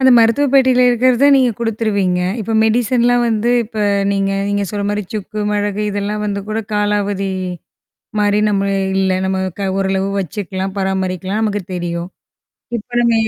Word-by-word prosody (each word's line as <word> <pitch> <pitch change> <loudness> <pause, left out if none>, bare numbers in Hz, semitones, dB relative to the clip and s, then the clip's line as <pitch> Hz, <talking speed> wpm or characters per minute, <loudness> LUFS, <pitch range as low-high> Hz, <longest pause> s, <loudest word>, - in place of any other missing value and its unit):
அந்த 260 0 +5
மருத்துவ 230 +5 +4
பெட்டியில 260 -2 +5
இருக்கிறது 250 +2 +3
நீங்க 260 -2 +4
குடுத்துருவீங்க. 210 -5 0 0.2
இப்ப 220 +2 -3
மெடிசன்லாம் 240 +2 +2
வந்து 225 +1 +1
இப்ப 220 0 -8 0.3
நீங்க 195 0 0 0.2
நீங்க 205 0 0
சொல்ற 205 -1 -3
மாரி 205 0 -1
சுக்கு, 215 0 -5
மிளகு 205 0 -1
இதெல்லாம் 205 +1 -2
வந்து 200 -1 -2
கூட 215 +1 -2
காலாவதி 205 -1 0 0.9
மாரி 205 0 +2
நம்ம 200 -2 +1 0.4
இல்ல, 190 0 +2 0.2
நம்ம 190 0 0 0.2
க - - -3 0.2
ஓரளவு 195 0 0
வச்சுக்கலாம், 190 +1 -4
பராமரிக்கலாம், 190 +1 -1
நமக்கு 205 -2 -1
தெரியும். 175 0 -3 0.7
இப்ப 210 - -10
நம்ம 235 -1 +3
205 Hz, 145 wpm, -17 LUFS, 195-225 Hz, 0.9 s, அந்த